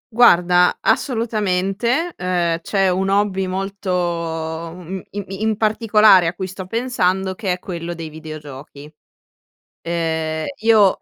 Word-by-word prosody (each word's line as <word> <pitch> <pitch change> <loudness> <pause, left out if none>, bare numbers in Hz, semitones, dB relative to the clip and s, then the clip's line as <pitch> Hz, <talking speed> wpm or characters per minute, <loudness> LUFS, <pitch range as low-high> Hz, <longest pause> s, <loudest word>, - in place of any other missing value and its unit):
Guarda, 180 -6 +5
assolutamente, 225 - 0
ehm, 175 -2 0
c'è 195 +2 +1
un 190 +2 0
hobby 195 -1 +1
molto 195 +1 -4
uhm, 170 +1 -3
im 205 0 -5
in 215 +2 -1
particolare 215 -4 +4
a 170 - -2
cui 190 - -4
sto 190 0 -8
pensando, 190 -5 0
che 190 -2 -2
è - - -4
quello 175 -2 -6
dei 165 -1 -7
videogiochi. 150 -1 -10 0.9
Ehm, 160 -2 -2 0.2
io 220 -4 +5
185 Hz, 120 wpm, -20 LUFS, 170-205 Hz, 0.9 s, Guarda